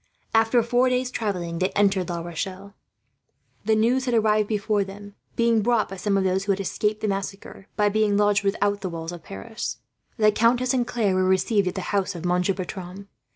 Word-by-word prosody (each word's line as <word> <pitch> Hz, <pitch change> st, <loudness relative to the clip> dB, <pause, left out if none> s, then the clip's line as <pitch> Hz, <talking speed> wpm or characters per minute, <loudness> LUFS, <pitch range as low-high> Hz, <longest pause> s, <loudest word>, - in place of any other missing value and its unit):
After 225 Hz, +1 st, +4 dB
four 245 Hz, +2 st, +2 dB
days' 250 Hz, 0 st, 0 dB
travelling, 180 Hz, -8 st, -3 dB
they 185 Hz, +1 st, +1 dB
entered 195 Hz, -3 st, +2 dB
La 170 Hz, -1 st, -3 dB
Rochelle. 185 Hz, +4 st, -6 dB, 0.9 s
The 220 Hz, +1 st, +3 dB
news 240 Hz, +4 st, +2 dB
had 245 Hz, -2 st, +1 dB
arrived 215 Hz, -1 st, +3 dB
before 210 Hz, -1 st, 0 dB
them, 200 Hz, +1 st, -10 dB, 0.2 s
being 235 Hz, -1 st, +3 dB
brought 235 Hz, 0 st, +1 dB
by 195 Hz, -, -6 dB
some 200 Hz, +1 st, 0 dB
of 195 Hz, -, +1 dB
those 190 Hz, +1 st, 0 dB
who 200 Hz, -, +2 dB
had 195 Hz, -, 0 dB
escaped 210 Hz, +2 st, -1 dB
the 215 Hz, -, 0 dB
massacre, 195 Hz, -1 st, -5 dB
by 210 Hz, -1 st, +3 dB
being 205 Hz, 0 st, +2 dB
lodged 205 Hz, 0 st, +3 dB
without 205 Hz, 0 st, 0 dB
the 190 Hz, -, -3 dB
walls 165 Hz, 0 st, -5 dB
of 175 Hz, -1 st, -8 dB
Paris. 155 Hz, -, -6 dB, 0.4 s
The 215 Hz, -2 st, +5 dB
countess 240 Hz, +4 st, +2 dB
and 245 Hz, -2 st, +1 dB
Claire 220 Hz, -6 st, 0 dB
were 185 Hz, 0 st, +2 dB
received 190 Hz, +2 st, +2 dB
at 180 Hz, -, -2 dB
the 190 Hz, -, -2 dB
house 200 Hz, -1 st, 0 dB
of 170 Hz, 0 st, -6 dB
Monsieur 180 Hz, +2 st, +1 dB
Bertram. 190 Hz, +1 st, -7 dB
205 Hz, 200 wpm, -24 LUFS, 190-220 Hz, 0.9 s, The